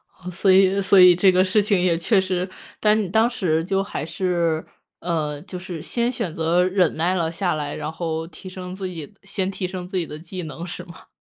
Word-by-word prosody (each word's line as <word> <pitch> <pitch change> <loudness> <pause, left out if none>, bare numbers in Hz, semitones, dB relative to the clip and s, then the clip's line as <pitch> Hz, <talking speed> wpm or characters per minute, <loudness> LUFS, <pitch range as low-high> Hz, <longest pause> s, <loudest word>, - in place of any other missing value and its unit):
哦， 180 -1 -9
所 190 +2 +2
以 190 +1 +5
所 195 0 +5
以 180 -1 +9
这 185 +2 +5
个 185 0 +4
事 200 +3 +3
情 200 -2 +2
也 175 -2 +2
确 195 +5 +2
实， 185 -1 -1 0.3
但 215 0 +3
你 205 - -1
当 220 +5 +3
时 170 -9 0
就 195 +3 0
还 195 - -5
是， 170 -2 -1 0.3
呃， 155 -4 -2
就 180 - -7
是 180 -3 -7
先 235 +8 -1
选 175 -9 -4
择 165 +2 +2
忍 185 0 +2
耐 170 +3 +1
了 165 -3 0
下 175 +1 -1
来， 145 -2 -3
然 155 - -4
后 160 -1 -3
提 175 +3 -11
升 185 0 -7
自 190 0 -4
己， 165 -5 -8
先 195 -1 -2
提 185 -1 -3
升 180 -1 -6
自 190 - -3
己 170 -3 -1
的 150 - -8
技 175 +3 -7
能 160 +2 -7
是 180 +2 -6
吗？ 170 - -14
180 Hz, 245 characters per minute, -22 LUFS, 165-190 Hz, 0.3 s, 以